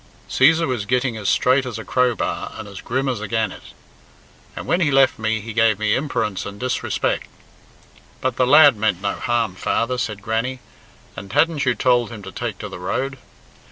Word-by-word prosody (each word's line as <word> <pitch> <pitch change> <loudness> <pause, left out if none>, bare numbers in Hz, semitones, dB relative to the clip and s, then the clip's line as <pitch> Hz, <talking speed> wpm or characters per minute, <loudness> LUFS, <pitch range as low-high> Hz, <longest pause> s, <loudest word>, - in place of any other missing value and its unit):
Cæsar 160 +5 +4
was 120 -6 -2
gitting 125 0 +1
as 105 -3 -2
straight 130 +2 +3
as 125 -4 -5
a 110 - -7
crowbar 120 -9 0
and 110 - -8
as 100 -1 -9
grim 130 +3 -2
as 125 -5 -2
a 110 - -4
gannet. 110 -1 -2 0.9
"And - - -6
when 175 - +1
he 160 - +3
left 135 -2 +3
me, 110 0 -1
he 110 +1 -7
gave 115 -2 +3
me 105 0 +1
imperence 110 -9 -2
and 100 0 -8
disrespeck." 130 0 -1 0.9
"But 130 -2 -1
the 125 0 +2
lad 145 -1 +7
meant 105 -4 0
no 100 - 0
harm, 115 -5 -1
father," 120 +6 -1
said 105 -3 -4
Grannie; 115 +4 -2 0.6
"and 100 0 -9
hadn't 160 -2 +2
you 125 - +3
told 120 -2 +2
him 110 -4 -9
to 95 - -8
take 115 -3 -4
to 105 - -6
the 95 - -9
road?" 130 +8 -3
115 Hz, 190 wpm, -21 LUFS, 105-130 Hz, 0.9 s, lad